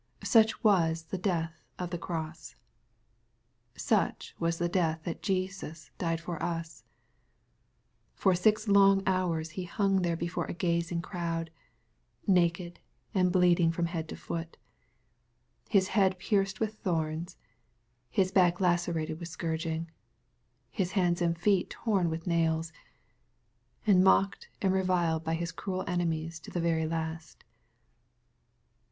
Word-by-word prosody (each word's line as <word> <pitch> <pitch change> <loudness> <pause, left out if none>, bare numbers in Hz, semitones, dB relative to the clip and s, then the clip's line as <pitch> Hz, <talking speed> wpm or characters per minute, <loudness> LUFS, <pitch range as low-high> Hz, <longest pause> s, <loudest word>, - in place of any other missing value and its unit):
Such 220 +1 +4
was 165 -6 +3
the 180 +3 -5
death 165 -3 -2
of 180 -1 -4
the 175 - -2
cross. 160 -2 -5 1.2
Such - - 0
was 165 0 0
the 175 - 0
death 165 -3 0
that 170 - -5
Jesus 185 -4 -3
died 165 -2 0
for 165 0 -6
us! 165 -1 -4 1.3
For 190 - +3
six 215 +5 +2
long 195 -1 +5
hours 170 -4 0
He 180 +2 -5
hung 195 +1 +1
there 170 -1 0
before 170 +1 -2
a - - -5
gazing 170 -1 -1
crowd, 165 -2 -3 0.7
naked, 175 -2 +1 0.3
and 185 -3 +3
bleed 180 -1 +4
ing 165 -1 +4
from 170 +1 -1
head 165 -2 -4
to - - -5
foot, 165 0 -6 0.6
— 120 0 -45 0.3
His 195 -2 +3
head 190 -3 +3
pierced 195 +1 0
with 215 -1 -2
thorns,— 165 -1 -2 0.7
His 185 +7 +1
back 175 -2 +4
lacerated 175 -3 0
with 170 -1 -6
scourging, 160 0 -3 0.4
— - - -45 0.3
His 185 -1 -2
hands 175 -3 +2
and 170 -1 +1
feet 190 +1 +2
torn 195 -7 0
with 160 +1 -4
nails, 165 -2 0 0.6
— - - -41
and 190 -4 +5
mocked 195 +1 +3
and 190 -1 +3
reviled 175 -4 +1
by 160 0 -1
His 170 0 -3
cruel 185 +2 -4
enemies 165 -2 -2
to - - -11
the 175 - -3
very 165 -1 +1
last. 160 0 -5
170 Hz, 140 wpm, -30 LUFS, 165-185 Hz, 1.3 s, long